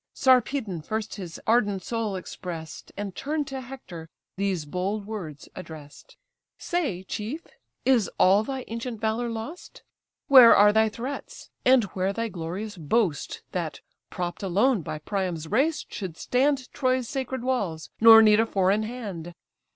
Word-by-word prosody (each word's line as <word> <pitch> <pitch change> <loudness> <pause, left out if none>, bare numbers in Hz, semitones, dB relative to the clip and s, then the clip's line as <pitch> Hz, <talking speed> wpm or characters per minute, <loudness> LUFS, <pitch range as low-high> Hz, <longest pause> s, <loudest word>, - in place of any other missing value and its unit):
Sarpedon 250 - +2
first 220 +6 -4
his 180 -5 -7
ardent 205 -5 +2
soul 225 -3 -2
express'd, 170 -3 -7
And, 200 -2 -5
turn'd 295 +1 -2
to 265 -1 -5
Hector, 240 -11 -10 0.3
these 190 -5 -1
bold 190 +6 -3
words 180 -9 -7
address'd: 160 - -11 0.4
"Say, 285 - -2
chief, 220 - -5 0.4
is 250 -6 +3
all 195 +3 +5
thy 265 +2 -5
ancient 230 0 -5
valour 225 +2 -1
lost? 230 +10 -8 0.4
Where 255 -5 +9
are 205 +1 +6
thy 220 0 +4
threats, 265 - -7
and 255 -2 +5
where 190 +1 0
thy 230 +2 -2
glorious 190 +4 -5
boast, 165 - -1
That - - -4 0.3
propp'd 175 -1 -4
alone 205 +4 +2
by 155 - -5
Priam's 175 -1 -3
race 275 - +1
should 185 -6 -6
stand 265 +1 0
Troy's 255 -3 0
sacred 260 -2 -4
walls, 200 -12 -2
nor 225 0 +9
need 215 0 +6
a 225 - +3
foreign 195 +1 +2
hand? 205 -8 -6
215 Hz, 145 wpm, -26 LUFS, 185-250 Hz, 0.4 s, Where